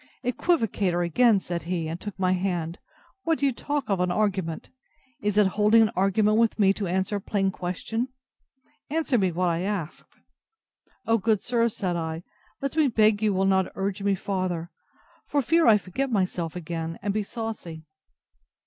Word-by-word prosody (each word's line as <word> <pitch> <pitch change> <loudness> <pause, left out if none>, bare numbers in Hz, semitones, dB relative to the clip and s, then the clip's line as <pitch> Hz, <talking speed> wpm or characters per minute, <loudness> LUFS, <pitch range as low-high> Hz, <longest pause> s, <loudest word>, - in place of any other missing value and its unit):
Equivocator, 220 - +1
again! 220 +4 +4
said 175 -2 -4
he, 170 -3 -1
and 165 +2 -5
took 205 -2 -7
my 185 -1 +1
hand, 180 -3 -1 0.4
what 325 -3 +1
do 285 - 0
you 270 - +2
talk 290 +2 -3
of 195 -3 0
an 180 0 +1
argument? 185 -4 -1 0.5
Is 205 0 0
it 210 - +6
holding 210 +4 +4
an 215 - +1
argument 205 +3 +3
with 230 -1 +2
me 195 -2 +4
to 200 -1 -3
answer 190 +3 0
a - - -6
plain 195 -1 0
question? 190 +7 -3 0.8
Answer 300 -5 +1
me 190 -2 +2
what 180 +1 0
I 170 0 -1
asked. 190 -5 -4 0.9
O, 230 0 +3
good 215 0 +1
sir, 235 -1 +2
said 185 -5 -2
I, 160 0 -3 0.4
let 275 +1 -2
me 310 -3 +4
beg 215 -3 +3
you 215 -1 +2
will 190 0 +1
not 190 -1 +2
urge 195 +1 -2
me 200 0 +2
farther, 185 -3 -3 0.6
for 290 - +1
fear 330 +3 +3
I 220 -2 +7
forget 210 +8 -3
myself 185 -5 -1
again, 165 -1 -4
and 200 0 0
be 215 - 0
saucy. 205 -7 -6
195 Hz, 175 wpm, -26 LUFS, 180-225 Hz, 0.9 s, I